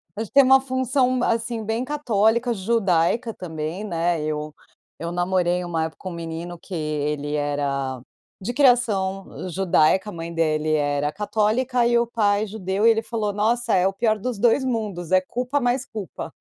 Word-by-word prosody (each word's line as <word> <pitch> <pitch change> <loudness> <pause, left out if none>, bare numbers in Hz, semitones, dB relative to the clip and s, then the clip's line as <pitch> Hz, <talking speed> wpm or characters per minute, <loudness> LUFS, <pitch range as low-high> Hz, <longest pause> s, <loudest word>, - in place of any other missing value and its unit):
A 220 - -2
gente 220 - -11
tem 275 0 +8
uma 265 +1 +6
função, 255 -1 +1
assim, 230 -1 -1
bem 225 +3 -1
católica, 235 -4 +1
judaica 215 +1 +1
também, 160 +2 -5
né, 170 -4 -1
eu 150 0 -3 0.5
eu 170 +1 -4
namorei 180 0 0
uma 165 -2 -1
época 160 - -8
com 185 - -6
um - - -7
menino 170 +1 -6
que 185 - -12
ele 150 -2 -2
era 140 -3 -1 0.4
de 235 +6 -4
criação 205 -9 +1
judaica, 190 +2 +2
a - - -11
mãe 165 0 -6
dele 155 -1 0
era 145 0 0
católica 220 +5 0
e 240 - +3
o 235 - +2
pai 210 -2 +1
judeu 200 0 -2
e 230 - +8
ele 225 0 +1
falou: 220 -3 -2
"Nossa, 230 +3 +1
é 185 0 +3
o - - 0
pior 215 +1 +1
dos 240 +1 -3
2 240 +5 +3
mundos, 210 -9 -3
é 185 - +6
culpa 250 +9 -2
mais 245 +1 0
culpa." 210 - -7
200 Hz, 175 wpm, -23 LUFS, 165-235 Hz, 0.5 s, tem